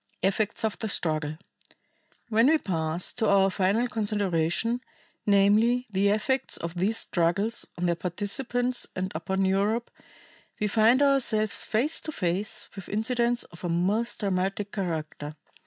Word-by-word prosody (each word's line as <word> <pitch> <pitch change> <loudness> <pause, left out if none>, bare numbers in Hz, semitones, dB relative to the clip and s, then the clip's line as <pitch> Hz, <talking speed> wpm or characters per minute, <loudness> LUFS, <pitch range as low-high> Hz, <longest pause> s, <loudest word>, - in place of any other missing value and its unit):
Effects 205 +4 +1
of 220 - -2
the 220 - -3
Struggle. 155 -4 0 0.9
When 225 +2 +4
we 320 +2 +5
pass 165 - -2
to 225 -3 0
our 195 -1 +4
final 200 +6 +1
consideration, 205 0 0 0.5
namely, 210 +5 +4
the 195 +1 +2
effects 215 +6 0
of 170 0 -5
these 195 +6 0
struggles 190 +6 0
on 180 - -1
their 175 - +2
participants 235 +8 -2
and 185 0 -3
upon 190 +4 -1
Europe, 205 +5 0 0.7
we 210 - 0
find 225 +6 +4
ourselves 240 -7 +2
face 260 +9 0
to 310 - -4
face 200 - -1
with 195 - -9
incidents 235 +3 0
of 170 - -14
a 175 - -2
most 195 +9 0
dramatic 195 +1 -1
character. 155 -5 -4
205 Hz, 140 wpm, -27 LUFS, 180-230 Hz, 0.9 s, we